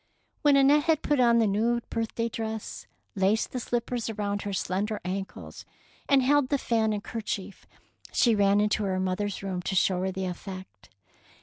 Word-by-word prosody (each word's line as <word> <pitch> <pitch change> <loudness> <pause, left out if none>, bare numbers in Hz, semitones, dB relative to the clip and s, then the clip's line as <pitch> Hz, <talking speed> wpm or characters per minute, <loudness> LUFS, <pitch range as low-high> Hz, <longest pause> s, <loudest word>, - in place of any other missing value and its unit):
When 290 -1 +5
Annette 285 +2 +5
had 320 -3 +2
put 295 -2 +1
on 235 -2 +5
the 230 - +4
new 225 +4 +1
birthday 230 0 -2
dress, 220 -1 -5 0.3
laced 200 +3 +1
the 255 - -3
slippers 240 -1 -2
around 205 -2 -2
her 205 - -4
slender 200 +3 -2
ankles, 190 +1 -6 0.5
and 275 -2 +5
held 285 0 +3
the 285 - +2
fan 225 -4 +1
and 205 -1 -3
kerchief, 205 -3 -5 0.4
she 235 - +3
ran 200 -1 +3
into 210 0 +1
her 185 -1 -1
mother^ 185 +2 -1
s 200 -1 -6
room 185 -2 -3
to 190 - -3
show 185 0 +2
her 190 0 -1
the 190 0 -3
effect. 185 - -8
210 Hz, 180 wpm, -27 LUFS, 195-235 Hz, 0.5 s, When